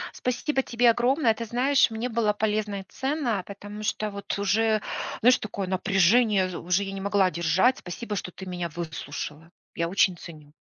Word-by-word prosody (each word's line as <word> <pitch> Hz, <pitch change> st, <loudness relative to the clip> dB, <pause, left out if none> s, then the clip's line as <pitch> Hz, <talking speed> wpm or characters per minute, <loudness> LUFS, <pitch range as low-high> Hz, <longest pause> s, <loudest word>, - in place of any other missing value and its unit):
Спасибо 265 Hz, +3 st, -1 dB
тебе 240 Hz, -1 st, +3 dB
огромное. 245 Hz, 0 st, +2 dB
Ты 230 Hz, +1 st, -6 dB
знаешь, 260 Hz, +5 st, +3 dB
мне 225 Hz, +2 st, -3 dB
было 225 Hz, -3 st, +1 dB
полезно 210 Hz, -1 st, -1 dB
и -, -, -12 dB
ценно, 265 Hz, -, -2 dB
потому 205 Hz, +1 st, -8 dB
что 215 Hz, 0 st, -2 dB
вот 200 Hz, 0 st, -4 dB
уже, 215 Hz, +2 st, +2 dB, 0.4 s
знаешь, 250 Hz, +2 st, +5 dB
такое 200 Hz, -3 st, -4 dB
напряжение 190 Hz, 0 st, +3 dB
уже 180 Hz, +3 st, +1 dB
я 195 Hz, -, -5 dB
не 195 Hz, -, -6 dB
могла 195 Hz, -2 st, +2 dB
держать. 175 Hz, +10 st, +2 dB
Спасибо, 210 Hz, +4 st, -6 dB
что 180 Hz, -, -4 dB
ты 190 Hz, -, -10 dB
меня 175 Hz, -2 st, -4 dB
выслушала. 155 Hz, -1 st, -6 dB, 0.2 s
Я 170 Hz, 0 st, -1 dB
очень 190 Hz, 0 st, +3 dB
ценю. 155 Hz, -3 st, -12 dB
205 Hz, 170 wpm, -26 LUFS, 185-235 Hz, 0.4 s, знаешь